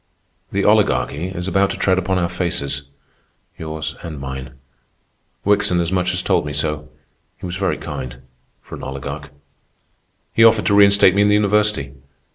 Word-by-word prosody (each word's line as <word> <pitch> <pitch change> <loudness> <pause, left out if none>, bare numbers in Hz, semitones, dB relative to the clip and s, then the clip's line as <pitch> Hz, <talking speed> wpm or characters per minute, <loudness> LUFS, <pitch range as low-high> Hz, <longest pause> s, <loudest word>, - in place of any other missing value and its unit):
"The - - 0
Oligarchy 75 +6 +2
is 90 -1 -5
about 95 +1 +2
to - - -4
tread 95 -1 +2
upon 95 0 -1
our 85 -1 +1
faces—yours 80 -1 -6
and 80 -5 -7
mine. 65 -1 -7 0.9
Wickson 100 -3 +2
as 85 0 -1
much 90 -1 +1
as 90 0 -1
told - - +2
me 75 - -5
so. 75 0 -3 0.5
He - - -9
was 90 0 -4
very 95 -6 0
kind—for 65 0 -10
an - - -7
oligarch. 65 0 -6 1.0
He 115 - +4
offered 110 -1 +5
to 100 - +3
reinstate 100 -2 +6
me 100 - +2
in 105 - +4
the 105 - +4
university. 105 -8 +1
90 Hz, 155 wpm, -20 LUFS, 70-100 Hz, 1.0 s, reinstate